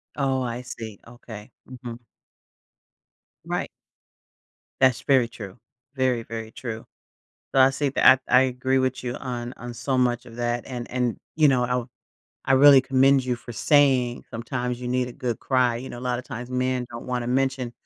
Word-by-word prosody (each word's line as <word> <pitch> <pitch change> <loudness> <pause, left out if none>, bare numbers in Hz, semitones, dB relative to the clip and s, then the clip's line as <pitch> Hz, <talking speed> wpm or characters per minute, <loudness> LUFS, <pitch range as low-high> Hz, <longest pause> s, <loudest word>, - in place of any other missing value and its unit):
Oh, 135 -2 0
I 120 0 -3
see. 110 -4 -8
Okay. 115 -3 -11 0.2
Mhm. 120 -2 -9 1.4
Right. - - -2 1.1
That's 130 -2 +4
very 130 -4 +3
true. 105 -3 -10 0.4
Very, 130 -3 +1
very 110 -1 -7
true. 115 -3 -7 0.7
So, 135 - +5
I 130 +1 +7
see 140 +1 -1
that 130 -1 +6
I - - +6
I - - +5
agree 130 +1 0
with 130 0 -2
you 120 - -3
on 120 -1 -5
on 120 0 -7
so 130 +3 -2
much 125 -1 +1
of 115 -1 -12
that 120 0 -2
and 120 -2 -6
and 125 -2 -1 0.2
you 155 -2 +5
know 125 -2 +3
I 125 - -3
w 125 0 -1 0.6
I 135 - +2
really 135 0 +8
commend 135 0 +3
you 125 -1 -1
for 120 0 -10
saying 130 -2 +2
sometimes 125 +1 -4
you 125 - -4
need 125 0 0
a 125 - -9
good 125 -4 -3
cry, 125 -3 +1
you 130 +2 -8
know 120 - -8
a - - -11
lotta 125 0 -2
times 125 -2 -7
men 125 -1 -1
don't 115 0 -8
wanna 125 -1 -3
mention 130 -1 0
125 Hz, 180 wpm, -24 LUFS, 120-130 Hz, 1.4 s, really